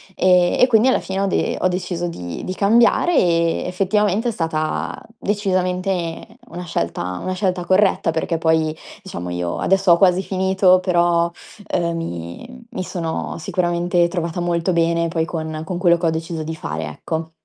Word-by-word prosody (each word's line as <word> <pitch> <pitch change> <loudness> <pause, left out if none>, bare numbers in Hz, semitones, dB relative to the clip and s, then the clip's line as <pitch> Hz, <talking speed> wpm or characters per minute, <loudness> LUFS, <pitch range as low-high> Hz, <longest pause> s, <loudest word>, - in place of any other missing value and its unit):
Ehm, 180 -1 +3
e 250 - +7
quindi 230 +1 +4
alla - - +3
fine 190 +1 -3
ho - - +2
de - - 0
ho 185 - +2
deciso 180 -1 -2
di 85 - -6
di 185 - -3
cambiare, 235 - +3
e 170 -1 +2
effettivamente 205 +4 +1
è - - -1
stata 160 -4 -2 0.2
decisamente 185 -3 -1 0.2
una 180 +1 -7
scelta 90 - -3
una 185 - -2
scelta 185 -2 -1
corretta, 185 -2 +3
perché 165 +1 -1
poi, 160 -1 +1 0.3
diciamo, 90 - -6
io 90 0 -3
adesso 195 -1 +3
ho 170 - +4
quasi 180 0 +4
finito, 190 -1 +3
però, 175 -2 +2 0.5
uhm, 170 -1 0
mi 165 - -7
mi 185 - -4
sono 170 -3 -4
sicuramente 175 0 +1
trovata 170 -1 -3
molto 175 +1 0
bene 170 0 +2
poi 160 -1 -1
con 160 -2 -4
con 180 -1 -4
quello 175 -2 +4
che 170 - -3
ho - - +4
deciso 160 0 -4
di 160 +1 -4
fare, 80 - -4
ecco. 160 - -5
175 Hz, 170 wpm, -20 LUFS, 165-185 Hz, 0.5 s, e